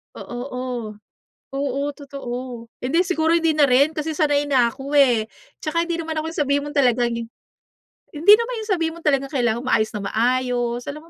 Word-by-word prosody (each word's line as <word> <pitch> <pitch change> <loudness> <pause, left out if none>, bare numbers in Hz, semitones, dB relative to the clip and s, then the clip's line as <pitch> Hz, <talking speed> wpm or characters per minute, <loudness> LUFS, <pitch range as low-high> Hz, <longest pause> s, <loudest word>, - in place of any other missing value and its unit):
Oo, 240 - -7
o. 250 - -4 0.9
Oo, 280 0 -1
totoo. 250 -4 -7 0.2
Hindi 330 +8 +1
siguro, 320 -3 +1
hindi 330 -2 +3
na 300 - +4
rin, 280 +3 +4
kasi 310 +1 -2
sanay 290 -2 +2
na 265 -5 +3
ako, 270 +4 -7
eh. 235 -5 +3 0.3
'Tsaka 335 +2 0
hindi 340 - -1
naman 320 -1 -3
ako 310 - -4
yung 325 - -5
sabihin 280 0 +1
mo - - -6
talagang 245 -3 +2 1.0
hindi 325 +7 +6
naman 465 +2 -3
yung 435 - -9
sabihin 325 -1 -1
mo - - -12
talagang 275 -3 +1
kailangan 240 -5 0
maayos 215 -4 +2
na 210 - -4
maayos. 245 +2 0
Alam 300 +2 -7
280 Hz, 180 wpm, -22 LUFS, 245-315 Hz, 1.0 s, hindi